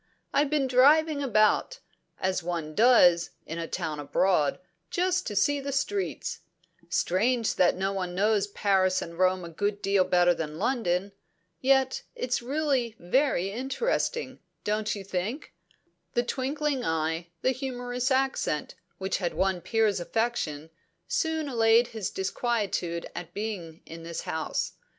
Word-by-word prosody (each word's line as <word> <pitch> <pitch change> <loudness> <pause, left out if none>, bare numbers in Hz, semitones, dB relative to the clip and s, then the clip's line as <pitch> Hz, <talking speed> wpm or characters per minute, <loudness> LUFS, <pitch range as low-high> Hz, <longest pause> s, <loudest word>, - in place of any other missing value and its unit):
"I've 290 0 +3
been 295 -2 +1
driving 285 +4 +4
about, 235 - +2 0.4
as 190 0 0
one 165 -3 -4
does 180 -6 +5 0.2
in 165 +1 -5
a 165 - -3
town 150 -2 -3
abroad, 150 +1 +2 0.3
just 365 0 0
to 210 - -4
see 285 +8 +2
the 280 0 -4
streets. 380 +9 -2 0.5
Strange 225 +6 +1
that 180 - +3
one 190 -1 -2
knows 205 +1 +2
Paris 190 -2 +2
and 170 +1 -10
Rome 185 -1 +2
a - - -7
good 205 +5 -2
deal 195 -1 +3
better 175 -1 +4
than 155 -2 -5
London. 200 -4 0 0.5
Yet 265 0 +2
it's 250 -1 -1
really 265 -3 0
very 195 -1 +1
interesting 460 - -2 0.2
don't 210 +1 -1
you 200 - -6
think?" 195 - -4 0.6
The 240 - +3
twinkling 275 +2 -1
eye, 160 -1 -1 0.2
the 260 - +3
humorous 250 -1 -3
accent, 265 - 0 0.2
which 190 0 -1
had 175 -3 -2
won 190 -1 +1
Piers' 220 -3 +1
affection, 175 -7 -2 0.4
soon 320 -11 0
allayed 230 -2 +4
his 215 -4 -4
disquietude 190 -4 -2
at 175 - -8
being 190 -7 -5
in 165 0 -9
this 165 0 -5
house. 160 0 -2
210 Hz, 135 wpm, -27 LUFS, 180-260 Hz, 0.6 s, does